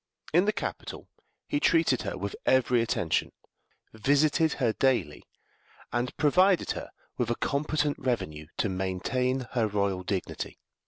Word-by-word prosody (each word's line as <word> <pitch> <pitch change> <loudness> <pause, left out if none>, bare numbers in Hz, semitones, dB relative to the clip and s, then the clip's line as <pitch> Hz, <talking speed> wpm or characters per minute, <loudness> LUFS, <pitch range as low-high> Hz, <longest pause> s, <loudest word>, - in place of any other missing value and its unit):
In 175 +4 +5
the 210 - +3
capital 215 - -5 0.4
he 290 - 0
treated 165 - +3
her - - -4
with 100 +1 -4
every 125 -2 +4
attention, 90 -8 0 0.6
visited 145 +7 +2
her 120 -5 +1
daily, 110 - +1 0.7
and 120 +1 -1
provided 180 +5 +4
her - - -5 0.3
with - - 0
a 120 - +1
competent 145 +2 0
revenue 80 -12 -2
to - - +1
maintain 95 +8 -1
her 115 -4 +1
royal 100 -2 0
dignity. 95 0 -4
125 Hz, 130 wpm, -28 LUFS, 100-150 Hz, 0.7 s, In